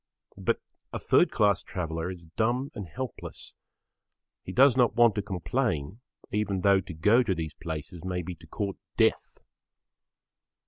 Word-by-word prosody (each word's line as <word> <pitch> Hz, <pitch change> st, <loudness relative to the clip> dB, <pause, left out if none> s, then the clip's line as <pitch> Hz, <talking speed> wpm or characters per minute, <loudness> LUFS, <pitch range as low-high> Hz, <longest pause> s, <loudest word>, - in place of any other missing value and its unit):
But -, -, +1 dB, 0.3 s
a -, -, -3 dB
third -, -, +4 dB
class 105 Hz, -1 st, +3 dB
traveller 80 Hz, -1 st, -3 dB
is 90 Hz, -2 st, -8 dB
dumb 125 Hz, +5 st, 0 dB
and 100 Hz, -5 st, -6 dB
helpless. 130 Hz, +8 st, -7 dB, 0.9 s
He -, -, -6 dB
does 130 Hz, +5 st, +6 dB
not 125 Hz, -2 st, +3 dB
want 120 Hz, -2 st, +6 dB
to 105 Hz, -, -1 dB
complain 100 Hz, -, -2 dB, 0.3 s
even 105 Hz, -3 st, 0 dB
though 100 Hz, 0 st, +5 dB
to 90 Hz, -, -9 dB
go 105 Hz, +10 st, +5 dB
to 100 Hz, -6 st, 0 dB
these 80 Hz, -2 st, -4 dB
places 80 Hz, +2 st, -6 dB
may 90 Hz, -1 st, -2 dB
be 90 Hz, -, -5 dB
to 85 Hz, 0 st, -16 dB
court 100 Hz, +3 st, -3 dB, 0.2 s
death. -, -, +2 dB
95 Hz, 150 wpm, -28 LUFS, 85-115 Hz, 0.9 s, does